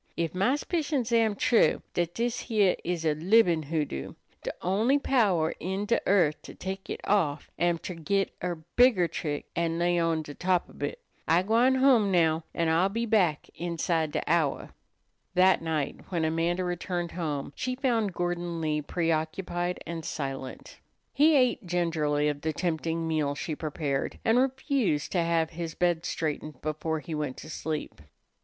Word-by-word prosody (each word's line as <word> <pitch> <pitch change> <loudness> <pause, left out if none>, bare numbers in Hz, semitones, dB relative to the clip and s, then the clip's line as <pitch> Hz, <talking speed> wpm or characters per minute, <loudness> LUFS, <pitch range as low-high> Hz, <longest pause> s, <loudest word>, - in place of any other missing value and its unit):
Ef 165 -1 -1
my 195 +9 +2
'spicions 290 -6 -1
am 225 -3 +3
true, 235 +3 +3
dat 175 -1 -1
dis 235 0 -1
heah 210 -6 +3
is 170 -1 -2
a 155 - +3
libin' 175 +1 +4
hoodoo, 145 - -3 0.3
de - - -3
only 215 +10 +3
power 205 - +2
in 190 +4 -2
de 230 +3 +1
earth 175 -7 +3
to - - -11
tek 190 +1 -6
it - - -4
off 155 -8 0
am 175 0 +2
ter 180 - -6
git 190 +4 0
er 175 -3 -3
bigger 240 -8 +5
trick 150 -2 -4
an' 165 -1 0
lay 175 0 +2
on 165 -1 +1
de 145 - -8
top 180 +2 +1
ob - - -15
hit. - - -3 0.3
I'm 175 +3 +3
gwine 235 +5 +4
home 260 -6 +4
now, 165 -2 +3
an' 165 - +1
I'll 165 +4 +3
be 230 +4 -2
back 190 -9 +2
inside 165 -1 -1
de - - -1
hour." 160 -3 0 0.6
That 185 +1 +5
night 155 -3 -2
when 170 -3 0
Amanda 165 +3 0
returned 175 -1 -3
home 150 -5 -3
she 255 0 -2
found 235 -6 +1
Gordon 175 -1 -2
Lee 155 -1 0
preoccupied 175 +3 -2
and 165 -1 -5
silent. 135 -4 -6 0.3
He 305 +2 +5
ate 250 -6 +2
gingerly 160 -4 +1
of 145 -1 -2
the 160 +1 -1
tempting 165 0 -1
meal 150 -3 0
she 155 +2 -4
prepared, 150 -3 -2
and 225 +2 +4
refused 260 - 0
to 180 - +2
have 165 -1 +1
his 165 -1 -5
bed 175 -2 +1
straightened 155 -3 -3
before 155 +1 -2
he 165 - -7
went 150 -4 -3
to 155 - -9
sleep. 155 - -4
170 Hz, 170 wpm, -28 LUFS, 160-200 Hz, 0.6 s, bigger